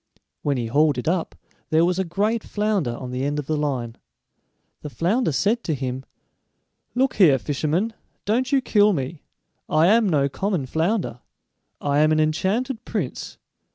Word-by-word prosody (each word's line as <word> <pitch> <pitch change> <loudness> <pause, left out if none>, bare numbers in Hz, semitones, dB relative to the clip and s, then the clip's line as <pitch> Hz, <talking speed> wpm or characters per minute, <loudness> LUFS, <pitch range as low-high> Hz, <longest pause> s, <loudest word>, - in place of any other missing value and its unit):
When 140 -2 0
he 120 - -2
hauled 145 +5 +2
it 125 - -4
up 170 0 -1 0.3
there 160 +2 +4
was 180 +1 0
a - - +2
great 205 +6 -1
flounder 205 - -1
on 125 -1 -7
the 125 +1 -3
end 145 +1 -1
of 145 - -3
the 155 - -1
line. 130 -6 -2 0.8
The 150 - -6
flounder 175 - 0
said 205 - +1
to 160 - 0
him: 130 0 -4 0.9
"Look 260 +1 +1
here, 155 -9 +6
fisherman, 155 - -1 0.3
don't 250 +6 0
you 275 -1 +3
kill 210 -4 +4
me; 145 0 -4 0.5
I 155 +1 +4
am 220 -1 +4
no 140 -4 +2
common 185 0 -2
flounder, 160 - -1 0.6
I 145 0 +1
am 155 +1 +4
an 155 - +3
enchanted 200 - 0
prince! 185 - -4
160 Hz, 165 wpm, -23 LUFS, 140-210 Hz, 0.9 s, here